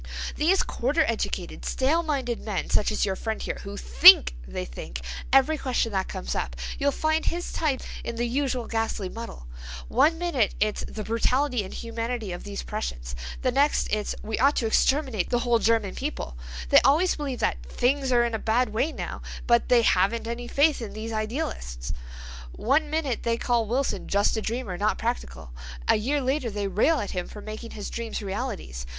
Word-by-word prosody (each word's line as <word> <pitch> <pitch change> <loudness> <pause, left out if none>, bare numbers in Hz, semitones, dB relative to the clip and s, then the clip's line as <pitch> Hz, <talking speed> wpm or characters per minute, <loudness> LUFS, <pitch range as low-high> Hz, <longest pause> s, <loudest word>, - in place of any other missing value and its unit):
"These 355 +6 +3
quarter 290 +7 +1
educated, 230 -1 -3
stale 290 +6 +1
minded 270 -7 -2
men 205 -4 -3
such 210 - +2
as 215 - +1
your 190 -2 -1
friend 220 +2 -3
here, - - -4
who - - -7
think - - +8
they 60 - -4
think, - - -7 0.3
every 275 +3 +4
question 245 -3 0
that 190 -2 -1
comes 60 0 -4
up, 60 - -3 0.2
you'll 280 0 +2
find 315 +3 0
his 345 +1 -2
type 295 -5 0 0.2
in 235 - -4
the 240 +1 -1
usual 255 -1 -1
ghastly 225 -4 -2
muddle. 225 - -8 0.4
One 325 +3 +4
minute 330 -11 0
it's 210 0 0
'the 215 - -6
brutality 250 +5 +1
and 190 -2 -3
inhumanity 230 -2 -4
of 175 - -6
these 200 -1 -5
Prussians'—the - - -4
next 280 +4 +2
it's 210 -1 -1
'we 220 0 -3
ought 280 +2 +4
to 235 - 0
exterminate 260 - +2
the 240 - +2
whole 240 -1 +2
German 225 -4 +2
people.' 275 - -4 0.3
They - - +7
always 325 +7 +4
believe 280 -4 -3
that - - 0
'things 260 - 0
are 240 -1 +5
in 235 - -2
a 220 - -1
bad 230 +3 +1
way 225 +9 0
now,' - - -6 0.2
but 235 -1 +3
they 240 -2 +5
'haven't 200 +4 +2
any 240 +1 -4
faith 285 +2 +3
in 225 - -6
these 225 +1 -5
idealists.' 145 - -3 0.6
One 295 +6 +1
minute 295 -6 -1
they 230 0 0
call 235 -2 +1
Wilson 245 -4 -1
'just 200 +3 +2
a 220 - -1
dreamer, 220 -5 -3
not 210 +1 +1
practical'—a 60 - -3
year 275 +7 0
later 260 -1 0
they 205 -1 -3
rail 280 +11 +2
at 205 - -4
him 180 -1 -3
for 210 - -10
making 215 +2 -7
his 205 - -5
dreams 230 -2 -4
realities. 195 - -4
230 Hz, 185 wpm, -26 LUFS, 205-270 Hz, 0.6 s, think